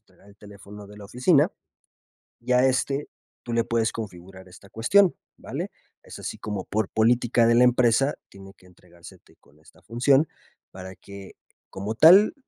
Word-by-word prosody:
entregar 100 - -25
el 100 - -19
teléfono 105 0 -14
de 105 +1 -15
la 105 - -11
oficina 140 - +2 0.9
y 125 +1 -3
a 125 +1 +4
este 135 +2 -1 0.4
tú 120 - -7
le 115 0 +1
puedes 115 -1 -1
configurar 95 -3 -10
esta 95 +2 -17
cuestión, 180 - +2 0.2
¿vale? - - -7 0.3
Es - - -12
así - - -7
como 100 -3 -6
por 110 -1 -3
política 120 +1 +1
de 115 - +3
la 125 +1 +5
empresa, 125 +2 +2
tiene 95 0 -15
que 90 - -23
entregársete 85 -1 -18
con 75 - -27
esta 80 - -23
función 135 +6 +1 0.4
para 95 0 -11
que, 100 +1 -13 0.4
como 100 +3 -6
tal, 180 - +6
110 Hz, 165 wpm, -24 LUFS, 95-125 Hz, 0.9 s, tal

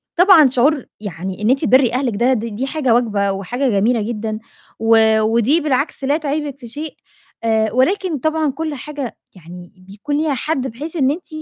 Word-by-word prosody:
طبعًا 350 -5 +7
شعور 270 +3 +1
يعني 190 -1 -6
إن 215 - +1
أنتِ 270 +1 +2
تبرّي 255 -2 +4
أهلِك 250 -4 -1
ده، 245 +4 +2
د 230 -2 -2
دي 265 +5 -3
حاجة 270 -5 0
واجبة 210 -4 +1
وحاجة 240 +8 -2
جميلة 220 +2 +1
جدًا 215 0 -4 0.4
و 225 -1 +4
ودي 235 +8 +2
بالعكس 280 -1 -1
لا 285 +3 +2
تعيبِك 290 -2 -3
في 240 - -10
شيء، 295 +6 -7 0.5
آآ 220 -1 +1
ولكن 325 - +1
طبعًا 315 +1 0
كل 310 +1 -4
حاجة 285 -3 -6 0.2
يعني 175 0 -12 0.2
بيكون 210 +9 -4
ليها 305 -2 0
حد 265 0 -2
بحيث 295 +9 -7
إن 275 -4 +2
أنتِ 340 +5 -6
255 Hz, 180 wpm, -18 LUFS, 220-295 Hz, 0.5 s, طبعًا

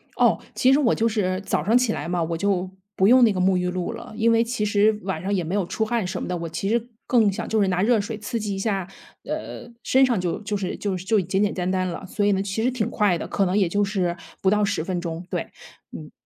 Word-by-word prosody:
哦， - - +3 0.2
其 260 +1 +4
实 280 - +4
我 250 -6 +3
就 225 - +1
是 190 -5 0
早 150 - 0
上 225 +8 +4
起 250 -3 +1
来 - - -4
嘛， 175 -1 0
我 165 0 -2
就 190 -1 0 0.3
不 190 - +3
用 250 +3 +7
那 225 - +6
个 185 - -2
沐 185 +1 +3
浴 180 0 0
露 180 -1 -3
了。 - - -9
因 230 0 +3
为 230 0 +4
其 230 -2 -2
实 210 +1 +3
晚 185 -4 -3
上 195 +2 -2
也 185 -3 0
没 165 +4 -4
有 200 -3 +1
出 220 - -2
汗 230 -2 -1
什 180 +1 -4
么 - - -4
的， 180 - -2
我 165 -1 -5
其 180 +4 -3
实 235 +2 0 0.2
更 225 -5 +3
想 - - -5
就 220 -1 +1
是 200 - +3
拿 180 0 +1
热 225 -1 +3
水 215 +2 -5
刺 230 +3 -4
激 205 -2 -3
一 - - -5
下， 195 -3 -1 0.4
呃， 235 - -6
身 265 +1 +4
上 240 -6 +1
就 180 -2 -2
就 205 0 -2
是 190 -2 -3
就 200 -3 -2
就 195 +3 +1
简 190 +3 0
简 205 - 0
单 180 -1 -2
单 185 0 0
了。 175 +2 -5
所 205 +2 -1
以 205 - +4
呢 195 - +1
其 200 +3 -2
实 255 - +2
挺 235 -3 -1
快 205 -7 +2
的， - - -5
可 195 - +1
能 185 +1 0
也 190 -4 +2
就 205 +4 +1
是 185 -3 -1 0.2
不 190 - +3
到 210 0 +3
10 200 -6 -1
分 180 0 -2
钟。 170 0 -5
对。 - - -2 0.5
嗯。 - - -9
200 Hz, 300 characters per minute, -23 LUFS, 185-220 Hz, 0.5 s, 用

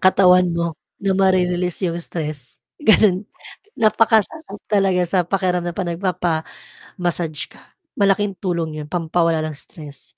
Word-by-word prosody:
katawan 180 -1 +5
mo, 170 -1 -1 0.3
na 195 -1 +2
mare-release 180 -2 +1
yung 170 - -4
stress, 150 -7 -6 0.2
gano'n. 210 -6 +4 0.5
Napakasarap 220 - +2
talaga 195 -3 +3
sa 185 +2 0
pakiramdam, 180 -2 -1
'pag 180 -3 -2
nagpapa-massage 170 -3 -2 0.9
ka, - - -17 0.3
malaking 200 0 +2
tulong 170 -4 -2
'yon, 150 - -8
pampawala 165 -1 +1
ng 155 - -4
stress. 145 -1 -9
180 Hz, 120 wpm, -20 LUFS, 170-195 Hz, 0.9 s, katawan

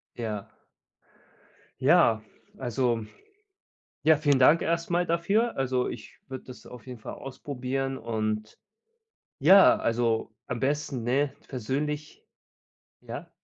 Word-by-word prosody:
Ja. 110 -4 -4 1.4
Ja, 110 -1 +5 0.4
also, 120 -2 0 1.0
ja, 160 +1 +6
vielen 145 -2 +2
Dank 150 +6 +6
erst 170 +1 -1
mal 175 +1 +1
dafür. 195 +8 +1
Also, 130 -1 0
ich 110 - -9
würde 130 -1 -7
das 125 - -12
auf 125 -3 -12
jeden 125 -2 -9
Fall - - -7
ausprobieren 135 0 -4
und 110 -2 -3 0.8
ja, 195 0 +8
also, 115 -1 0
am 120 -2 -4
besten, 140 -2 -1
ne, 135 +4 +1
persönlich, 145 +5 -4 0.8
ja? - - -8
130 Hz, 110 wpm, -27 LUFS, 115-150 Hz, 1.4 s, ja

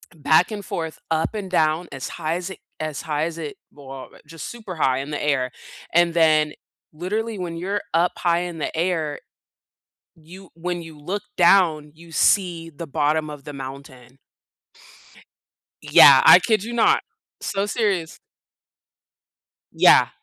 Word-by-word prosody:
back 155 +5 +3
and 205 -2 -5
forth, 160 -3 -5
up 160 +4 0
and 205 -3 -5
down, 160 0 +1
as 135 -1 -6
high 160 0 -3
as 180 +1 -5
it 185 - -10 0.2
as 155 -2 -4
high 150 -1 -2
as 165 0 -4
it 150 -3 -6 0.2
well, 135 -2 -10
but - - -19
just 165 -1 -8
super 215 -6 -8
high 135 -4 +1
in 140 +2 -6
the 150 - -4
air. 130 -4 0 0.4
And 170 0 +3
then, 155 -2 +3 0.4
literally, 210 +6 -3
when 170 -2 -5
you're 195 +4 -2
up 170 +2 +2
high 170 0 +1
in 175 -2 -6
the - - -4
air, 165 -4 -1 1.0
you 175 +4 -14
when 175 +1 -4
you 160 -2 -12
look 195 +7 -4
down, 170 -5 +4
you 170 +1 -16
see 170 -1 +1
the 165 +2 -9
bottom 155 +1 0
of 145 -2 -9
the 145 - -9
mountain. 135 -1 -10 1.6
Yeah, - - +8
I - - +10
kid 215 -3 0
you 235 - -6
not. 235 - +3 0.4
So 200 0 -2
serious. 200 -7 -1 1.5
Yeah, - - +6
165 Hz, 155 wpm, -22 LUFS, 150-180 Hz, 1.6 s, I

